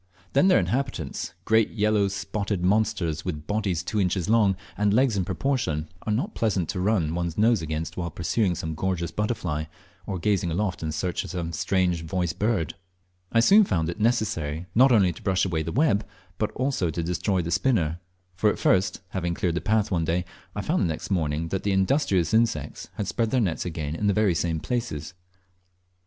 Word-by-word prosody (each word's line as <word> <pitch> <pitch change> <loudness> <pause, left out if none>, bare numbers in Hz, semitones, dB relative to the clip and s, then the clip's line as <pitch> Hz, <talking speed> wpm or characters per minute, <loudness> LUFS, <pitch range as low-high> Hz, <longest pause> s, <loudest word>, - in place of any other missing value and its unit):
Then 140 +7 +5
their 185 - +6
inhabitants, 125 - -2
great 110 -1 +4
yellow 105 -2 +2
spotted 100 -1 -3
monsters 90 -6 +1
with 75 -4 -4
bodies 100 -5 -1
two 105 +3 -1
inches 90 -2 0
long, 105 -3 +4 0.2
and 105 0 +2
legs 125 +1 +3
in 95 - +1
proportion, 90 - -1 0.2
are - - +1
not 140 - -1
pleasant 95 -7 0
to 95 - -2
o - - -1
run 90 -6 +1
one's 85 -1 -2
nose 110 -1 +4
against 80 0 -4
while 85 -1 -2
pursuing 90 +4 0
some 80 0 -4
gorgeous 85 0 -2
butterfly, 90 -6 -2 0.4
or 95 - -2
gazing 95 -1 +1
aloft 95 +3 -1
in 80 -1 -2
search 85 +4 -2
of - - -8
some 85 -2 -4
strange 90 0 +1
voiced 85 -1 -2
bird. 105 -7 0 0.6
I 115 - +4
soon 205 - +7
found 80 - 0
it 85 - -5
necessary 105 -9 0
not 130 +3 +6
only 95 -7 +4
to - - -13
brush 95 -2 +1
away 85 -4 -1
the 80 +1 -3
web, 120 - +2 0.4
but 110 - +1
also 130 -9 0
to 85 +1 -3
destroy 90 +2 0
the 85 - -4
spinner; 85 -7 +1 0.3
for 100 +4 +2
at - - -1
first, 95 0 +2
having 85 -2 -2
cleared 85 -1 0
the 85 - -2
path 110 -1 +1
one 85 -3 +1
day, 85 +2 0 0.3
I - - -2
found - - +1
the - - +2
next 80 +4 -4
morning 80 -2 0
that 95 - -2
the 100 - 0
industrious 95 - +2
insects 110 -11 0
had 105 - -2
spread 115 +2 0
their 130 - +2
nets 95 -8 0
again 80 -3 -3
in 105 +5 -1
the 100 - +3
very 105 -4 +3
same 80 0 -1
places. 115 - -3
95 Hz, 200 wpm, -26 LUFS, 85-110 Hz, 0.6 s, soon